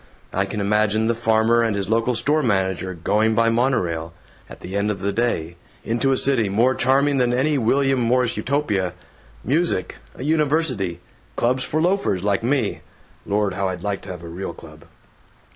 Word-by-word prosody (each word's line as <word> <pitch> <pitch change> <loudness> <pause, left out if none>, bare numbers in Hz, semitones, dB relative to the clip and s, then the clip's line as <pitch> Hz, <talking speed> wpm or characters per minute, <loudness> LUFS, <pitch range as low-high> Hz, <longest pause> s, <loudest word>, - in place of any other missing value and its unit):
I 95 +1 +1
can 105 +2 -5
imagine 105 +2 +1
the 115 - +2
farmer 115 0 +2
and 115 -3 0
his 100 -1 -2
local 115 +2 +1
store 150 +6 +2
manager 95 -5 -1
going 105 +6 +1
by 115 0 +3
monorail, 90 -10 0 0.3
at - - -12
the 95 - -7
end 100 +1 0
of 100 -3 -2
the 100 0 -1
day, 85 -8 -1 0.3
into 120 +4 0
a 130 - +2
city 125 -7 +2
more 115 +6 +3
charming 135 +3 +2
than 125 -2 +2
any 140 +4 +1
William 135 +3 +2
Morris 125 0 +1
Utopia 110 -10 -1 0.5
music, 150 - 0 0.2
a - - -7
university, 145 - 0 0.3
clubs 125 +2 +1
for 155 - -2
loafers 170 - +1
like 100 +2 +1
me. 120 -2 0 0.5
(Lord, 100 -1 0
how 95 +1 -1
I'd 90 -1 -6
like 100 -1 -2
to - - -11
have 90 -2 -7
a - - -8
real 85 +1 -6
club!)" 80 -2 -14
110 Hz, 175 wpm, -22 LUFS, 95-130 Hz, 0.5 s, by